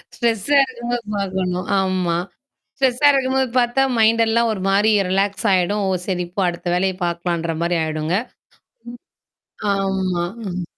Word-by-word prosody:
ஸ்ட்ரெஸ்ஸா 235 +4 +1
இருக்கும்போது 240 -2 -4
பார்க்கணும். 185 -2 -2
ஆமா. 185 -3 0 0.6
ஸ்ட்ரெஸ்ஸா 265 +1 +3
இருக்கும்போது 265 -1 +1
பார்த்தா 245 +2 +2 0.2
மைண்ட் 225 +1 +4
எல்லாம் 230 +1 +2
ஒரு 205 - -5
மாரி 205 +3 +3 0.2
ரிலாக்ஸ் 195 +2 0
ஆயிடும். 190 +3 +1
ஓ! - - +1 0.2
சரி 180 -2 -1
போ 195 - 0
அடுத்த 175 +1 -6
வேலைய 190 +1 +1
பார்க்கலான்ற 170 -1 -2
மாரி 170 +1 +1
ஆயிடுங்க. 155 +2 -1 0.8
ம். 245 - -10 0.8
ஆமா. 190 -3 -1 0.2
ம். 180 0 -4
195 Hz, 135 wpm, -20 LUFS, 180-235 Hz, 0.8 s, மைண்ட்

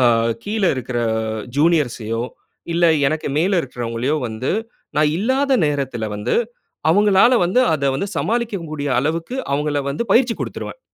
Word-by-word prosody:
அ - - +3 0.4
கீழ 215 0 -2
இருக்குற 125 -1 -3 0.6
ஜூனியர்ஸையோ 135 -8 +1 0.5
இல்ல 170 +1 +2 0.2
எனக்கு 155 +1 -1
மேல 185 +5 +2
இருக்குறவங்களையோ 125 +1 -2
வந்து 110 +3 -3 0.5
நா - - +4 0.2
இல்லாத 265 +8 +1
நேரத்துல 130 -7 -2
வந்து, 105 +4 -1 0.6
அவங்களால 205 +5 +5
வந்து 185 +9 +2
அத 140 -3 +1
வந்து 200 - -2
சமாளிக்க 225 -5 -1
கூடிய 145 -2 -3
அளவுக்கு 165 - -2 0.2
அவங்கள 145 0 0
வந்து 145 - -2
பயிற்சி 240 -2 +4
குடுத்துருவேன். - - -5
155 Hz, 130 wpm, -20 LUFS, 130-205 Hz, 0.6 s, அவங்களால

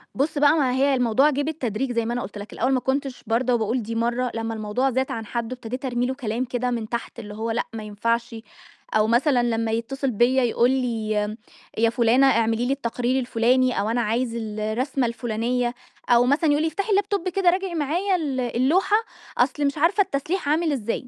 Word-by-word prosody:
بُص 290 +3 0
بقى 290 +1 +5
ما 270 -5 +2
هي 275 +2 +2
الموضوع 250 +3 +3
جِه 290 -1 -1
بالتدريج 270 -5 -2
زي 230 -1 0
ما 235 - -2
أنا 245 - -2
قلت 210 - -7
لك، 205 +1 -9
الأول 255 - 0
ما 260 - +2
كنتش 270 0 -2
بارْضَى 240 +3 +1
وباقول 230 +1 0
دي 230 +2 -5
مرة، 240 +2 0
لمّا 225 0 -3
الموضوع 220 +5 -1
زاد 260 +2 -1
عن 225 -1 -4
حدّه، 235 +2 -3
ابتديت 250 +2 -6
أرمي 245 -1 0
له 260 - -1
كلام 240 -1 -2
كده 250 0 -2
من 225 -3 -3
تحت، 235 0 -5
اللي 210 -2 -8
هو 225 +2 -3
لأ 230 - 0
ما 220 -1 -5
ينفعش، 230 +3 -2 0.6
أو 215 0 +3
مثلًا 245 +2 +3
لمّا 225 -1 0
يتصل 260 +4 -2
بيّا 245 +4 +3
يقول 240 +1 +2
لي 235 -5 -1 0.7
يا 230 +1 +3
فٌلانة 235 +3 +4
اعملي 230 -1 +2
لي 265 - +1
التقرير 245 0 -1
الفٌلاني 250 0 +2
أو 205 +2 0
"أنا 240 +1 +1
عايز 230 +2 -1
الرسمة،" 225 +4 -2
الفٌلانية 240 +1 -1 0.4
أو 240 0 +5
مثلًا 290 +5 +2
يقول 290 +1 +2
لي: 320 - +1
"افتحي 390 +7 -3
اللاب 405 0 +2
توب 390 -3 -1
كده، 370 0 +2
راجعي 370 0 -1
معايا 340 +6 0
ال 290 -7 -2
اللوحة 265 - +2 0.4
أصل 280 +4 +1
مش 280 +1 -1
عارفة 345 +7 +3
التسليح 315 +1 -2
عامل 315 +1 +2
إزاي؟" 245 -2 -3
245 Hz, 205 wpm, -23 LUFS, 230-275 Hz, 0.7 s, بقى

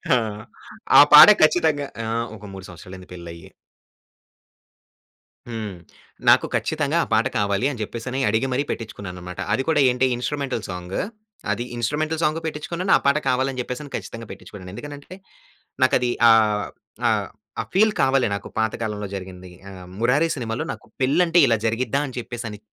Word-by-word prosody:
ఆ! - - +4 0.8
ఆ - - +12
పాట 150 - +12
ఖచ్చితంగా 155 -2 +3 0.2
ఆ! - - -4 0.3
ఒక 105 - -13
3 95 -1 -9
సంవత్సరాలు 90 +2 -11
అయింది 90 - -14
పెళ్లి 85 -1 -9
అయ్యి. 85 - -13 2.0
హ్మ్. 110 -5 -5 0.5
నాకు - - +6
ఖచ్చితంగా 155 +1 -1
ఆ - - -7
పాట 110 +4 +3
కావాలి 100 +2 0
అని 125 - -8
చెప్పేసని 125 +5 -5
అడిగి 110 +5 +1
మరి 135 +3 +1
పెట్టించుకున్నాను 100 -4 -6
అన్నమాట. 90 0 -9
అది 130 - 0
కూడా 160 -2 +2
ఏంటి 125 +1 +1
ఇన్‌స్ట్రుమెంటల్ 130 -1 -3
సాంగు. 90 +1 -4 0.5
అది 120 - -2
ఇన్‌స్ట్రుమెంటల్ 155 +7 -1
సాంగ్. 155 +1 +1
పెట్టించుకున్నాను, 170 +4 -3
ఆ - - -4
పాట 140 - +4
కావాలని 130 0 0
చెప్పేసని 130 +4 -7
ఖచ్చితంగా 115 -1 -7
పెటించుకున్నాను. 95 -1 -11
ఎందుకనంటే 145 - -9 0.7
నాకు 130 - +4
అది 125 -1 0 0.2
ఆహ్, 105 -2 +4 0.4
ఆహ్, - - 0 0.5
ఫీల్ 215 +3 +4
కావాలి 135 -1 +3
నాకు - - -7
పాతకాలంలో 110 -2 -2
జరిగింది. 90 -1 -9 0.2
ఆహ్, 90 -1 -11
'మురారి' 140 +8 +2
సినిమాలో 120 +5 -3
నాకు - - -14 0.2
పెళ్ళంటే, 165 +6 +3
ఇలా 115 -1 +3
జరిగిద్దా 120 +4 0
అని 130 - -9
చెప్పేసని 115 -3 -7
120 Hz, 150 wpm, -22 LUFS, 105-145 Hz, 2.0 s, ఆ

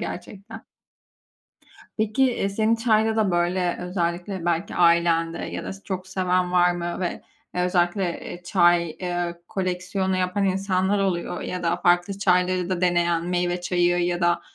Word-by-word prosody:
gerçekten. 190 +3 -8 1.3
Peki, 220 +4 +1
eee, 240 -6 +1
senin 220 +3 +1
çayda 220 -1 +2
da 215 -4 +2
böyle, 175 +1 0
özellikle 180 0 -3
belki 175 +4 -1
ailende 170 -1 +3
ya - - -5
da - - -5
çok 185 -1 -5
seven 185 -1 0
var 180 0 +4
mı 175 0 -4
ve 180 -2 -3 0.3
özellikle, 180 +1 +1 0.2
eee, 175 - -9
çay, 175 -2 +3
eee, 175 +1 -4
koleksiyonu 185 0 -2
yapan 185 +2 0
insanlar 190 +1 +1
oluyor 180 -2 -1
ya 180 0 -4
da 170 0 +1
farklı 175 +3 +1
çayları 180 -1 +2
da 185 -1 -2
deneyen, 175 -1 +1
meyve 175 0 -1
çayı 175 0 +1
ya 175 0 -1
da, 175 0 +2
180 Hz, 145 wpm, -24 LUFS, 175-190 Hz, 1.3 s, var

